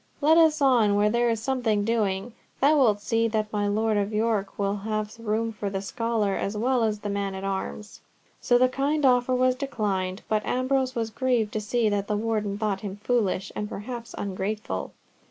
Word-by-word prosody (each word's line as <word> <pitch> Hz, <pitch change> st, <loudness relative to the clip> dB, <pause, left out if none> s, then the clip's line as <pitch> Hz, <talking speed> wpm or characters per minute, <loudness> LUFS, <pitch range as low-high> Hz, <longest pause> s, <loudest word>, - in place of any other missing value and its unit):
let 310 Hz, +2 st, +5 dB
us 315 Hz, -3 st, +4 dB
on 235 Hz, -7 st, +4 dB
where 210 Hz, +1 st, +3 dB
there 235 Hz, +1 st, +2 dB
is 225 Hz, -1 st, 0 dB
something 225 Hz, -4 st, 0 dB
doing! 215 Hz, -1 st, -1 dB, 0.3 s
Thou 290 Hz, +3 st, +5 dB
wilt 230 Hz, -8 st, +4 dB
see 225 Hz, +2 st, +1 dB
that 215 Hz, -1 st, -2 dB
my 205 Hz, -1 st, 0 dB
Lord 215 Hz, +1 st, +1 dB
of 200 Hz, +1 st, 0 dB
York 215 Hz, -2 st, -1 dB
will 200 Hz, 0 st, 0 dB
have 215 Hz, +1 st, -3 dB
room 225 Hz, 0 st, -1 dB
for 210 Hz, -1 st, -4 dB
the 195 Hz, -1 st, -3 dB
scholar 215 Hz, 0 st, -1 dB
as 200 Hz, +2 st, -2 dB
well 245 Hz, +2 st, +1 dB
as 210 Hz, -2 st, -1 dB
the -, -, -4 dB
man 200 Hz, -1 st, -2 dB
at 190 Hz, -, -6 dB
arms." 195 Hz, +2 st, -4 dB, 0.4 s
So 245 Hz, -, +3 dB
the 255 Hz, +1 st, +5 dB
kind 280 Hz, +3 st, 0 dB
offer 250 Hz, 0 st, +3 dB
was 255 Hz, 0 st, +3 dB
declined, 205 Hz, -8 st, -2 dB
but 215 Hz, -1 st, 0 dB
Ambrose 260 Hz, +1 st, 0 dB
was 225 Hz, -1 st, -2 dB
grieved 240 Hz, -3 st, 0 dB
to 215 Hz, -, -1 dB
see 225 Hz, +2 st, +1 dB
that 205 Hz, -1 st, 0 dB
the 210 Hz, -, 0 dB
Warden 210 Hz, -2 st, -1 dB
thought 205 Hz, -2 st, -1 dB
him 195 Hz, -2 st, -5 dB
foolish, 205 Hz, -3 st, -1 dB
and 210 Hz, 0 st, -3 dB
perhaps 235 Hz, +3 st, -7 dB
ungrateful. 195 Hz, -, -3 dB
215 Hz, 195 wpm, -26 LUFS, 205-245 Hz, 0.4 s, let